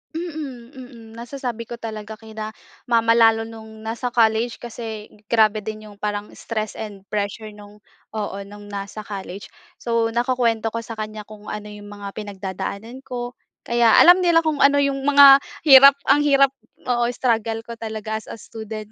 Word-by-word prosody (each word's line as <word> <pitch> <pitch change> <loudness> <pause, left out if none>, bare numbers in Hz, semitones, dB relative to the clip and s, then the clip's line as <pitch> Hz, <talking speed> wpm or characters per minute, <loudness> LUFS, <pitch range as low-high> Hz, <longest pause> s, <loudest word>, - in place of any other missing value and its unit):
Mm 290 -7 -7
mm 255 -1 -10 0.3
nasasabi 240 -1 -5
ko 240 - -6
talaga 220 -1 -7
kina 220 -1 -7 0.4
mama 230 -1 +3
lalo 225 -1 +5
noong 220 -1 -12
nasa 230 +3 -3
college, 225 0 +2
kasi 225 -2 -7 0.2
grabe 215 -2 +3
din 215 0 -7
yung 205 - -13
parang 210 0 -3
stress 215 -2 -4
and 205 -3 -8
pressure 210 +1 -3
noong 205 0 -14 0.4
oo, 205 -2 -3
noong 205 +1 -12
nasa 200 +1 -6
college. 195 -1 -7 0.3
So 230 -1 0
nakukuwento 235 -2 0
ko 230 +1 -3
sa 230 - -8
kanya 215 0 -5
kung 210 -1 -13
ano 210 0 -6
iyong 205 0 -11
mga 205 -1 -9
pinagdadaanan 205 +3 -6
ko, 245 -1 -5 0.3
kaya 235 -1 +3
alam 355 +2 +8
nila 340 -2 +4
kung 310 -3 -1
ano 285 0 +5
yung 275 -1 0
mga 280 -1 +9 0.3
hirap 275 0 +10
ang 280 +2 +5
hirap 275 -2 +4 0.4
oo 240 -1 +1
struggle 225 -2 -1
ko 235 0 -8
talaga 220 -1 -4
as - - -18
a - - -7
student 220 -1 -9
225 Hz, 165 wpm, -22 LUFS, 215-245 Hz, 0.4 s, hirap